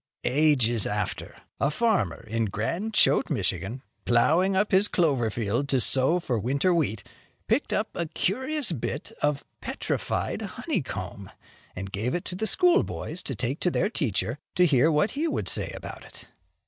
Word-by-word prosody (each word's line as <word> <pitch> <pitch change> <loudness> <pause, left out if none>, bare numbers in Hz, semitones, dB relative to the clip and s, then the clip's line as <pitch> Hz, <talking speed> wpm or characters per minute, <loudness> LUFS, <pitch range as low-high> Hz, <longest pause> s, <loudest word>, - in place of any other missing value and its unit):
Ages 130 -6 +3
after, 105 0 -3 0.2
a 140 - +2
farmer 195 - 0
in 115 +1 -1
Grand 170 - -2
Chote, - - +4
Michigan, 120 +8 -2 0.2
plowing 165 +11 +3
up 205 +2 +2
his 195 +1 +4
clover 140 - +2
field, 115 +5 -1
to 135 - +3
sow 135 +8 +3
for 125 -9 -1
winter 140 - +1
wheat, 120 - 0 0.4
picked - - +1
up - - +1
a 170 - -2
curious 260 - -1
bit 140 -1 -3
of 145 -1 0 0.2
"petrified - - -2
honeycomb," - - -4 0.5
and 95 +1 -6
gave 110 - -1
it 175 - -3
to 180 - -5
the 220 +4 -1
schoolboys 355 - +2
to 135 - -4
take 125 +7 -2
to 180 - +1
their 205 +4 0
teacher, 120 - -1 0.2
to 180 - +5
hear 150 0 +4
what 150 +7 +2
he 305 +4 -1
would - - -2
say - - +1
about - - -8
it. - - -12
145 Hz, 160 wpm, -27 LUFS, 120-180 Hz, 0.5 s, to